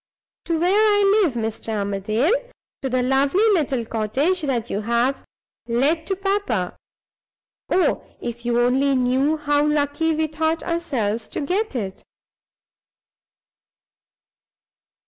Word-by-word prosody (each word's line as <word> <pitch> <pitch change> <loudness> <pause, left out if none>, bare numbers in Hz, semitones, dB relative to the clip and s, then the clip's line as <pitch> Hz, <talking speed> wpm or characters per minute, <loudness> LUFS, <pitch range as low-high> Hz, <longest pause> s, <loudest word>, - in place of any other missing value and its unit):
To 335 -1 0
where 355 +3 +2
I 410 -1 +4
live, 340 -10 +2
Mr. 225 -1 -3
Armadale; 205 - 0 0.5
to 270 - -2
the 255 0 +1
lovely 275 - +2
little 270 - 0
cottage 260 - 0
that 250 -6 -1
you 205 - -1
have 235 +4 0 0.4
let 285 +8 +1
to 385 - 0
papa. 390 - -1 0.9
Oh, 370 - +2 0.2
if 240 0 -6
you 240 0 +1
only 265 +3 +2
knew 260 +5 +2
how 290 -1 +1
lucky 300 +2 +1
we 315 0 +1
thought 315 +1 -1
ourselves 235 -11 -2
to - - -4
get 370 +4 -1
it!" 195 -5 -4
275 Hz, 120 wpm, -22 LUFS, 235-330 Hz, 0.9 s, I